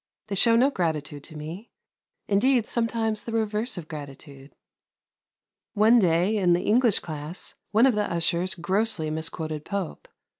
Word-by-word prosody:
They - - -3
show 230 +4 +4
no 260 +5 +4
gratitude 155 - -2
to 155 - -10
me 165 +9 -8 0.6
indeed, 230 +4 +3
sometimes 225 -2 -1
the 230 - -6
reverse 220 +1 -1
of 165 -3 -7
gratitude. 140 -2 -10 1.2
One 220 +3 +6
day, 180 +3 +2
in 180 -3 +3
the 175 - +1
English 230 0 +3
class, 155 +2 -7 0.2
one 225 +4 +4
of 265 - +4
the 210 -1 -1
ushers 170 +2 0
grossly 185 -2 0
misquoted 155 -1 -4
Pope. 200 -2 -5
185 Hz, 145 wpm, -26 LUFS, 160-225 Hz, 1.2 s, One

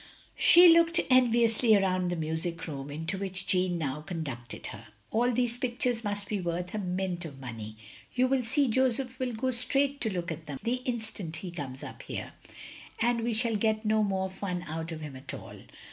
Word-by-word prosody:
" - - -32
She 350 +1 +10
looked 335 0 +5
enviotisly 235 -3 +5
round 185 -2 +1
the 175 - -1
mtisic 160 +1 -3
room, 140 -3 -6
into 160 +6 -3
which 190 -1 -4
Jeanne 180 -1 +2
now 150 -2 -2
conducted 145 - -6
her. 115 +1 -11 0.2
"All 240 +3 +3
these 245 0 0
pictures 245 -2 -1
must 205 -1 -3
be 205 -2 -2
worth 175 +1 -3
a 215 - -1
mint 180 -2 -2
of 145 -5 -8
money. 110 -4 -7 0.4
You 250 +1 +4
will 265 0 +2
see, 270 +4 +2
Joseph 255 +1 +1
will 255 -2 -1
go 255 +4 0
straight 275 +3 +2
to 220 - +1
look 175 -2 -3
at 160 0 -7
them 140 -2 -5
the 240 +2 +1
instant 220 -8 -4
he 175 +2 -6
comes 140 -6 -6
up - - -8
here, - - -6 0.7
and 235 0 +2
we 235 0 0
shall 230 0 0
get 215 +1 +1
no 215 0 +3
more 190 -2 0
fun 185 -2 -4
out 160 +2 -4
of 160 -1 -6
him 150 -3 -7
at 130 - -7
all. - - -10
195 Hz, 200 wpm, -29 LUFS, 165-240 Hz, 0.7 s, She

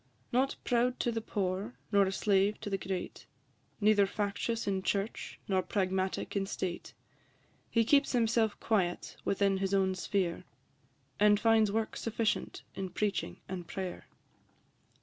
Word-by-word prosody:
Not 260 +3 +2
proud 245 +1 +1
to 240 - +1
the 225 -1 -2
poor, 200 +2 -2 0.2
nor 200 -2 +5
a - - -1
slave 200 +1 +2
to 210 -2 -5
the 195 - +1
great, 185 -1 -5 0.5
Neither 205 -1 +5
factious 205 +3 -2
in 195 -1 0
church, 200 +3 -2
nor 190 -2 +2
pragmatic 190 0 -1
in 195 -1 0
state, 185 -2 -4 0.7
He 230 -1 +3
keeps 280 +3 +4
himself 225 -2 +2
quiet 185 -6 0
within 195 -1 +2
his 195 +1 0
own 190 -1 +2
sphere, 185 -1 -1 0.8
And 205 0 +5
finds 220 -2 +4
work 220 +1 -1
sufficient 230 -1 -1
in 190 -1 -4
preaching 205 +2 -2
and 180 -2 -5
prayer. 190 -2 -5
200 Hz, 140 wpm, -32 LUFS, 190-225 Hz, 0.8 s, nor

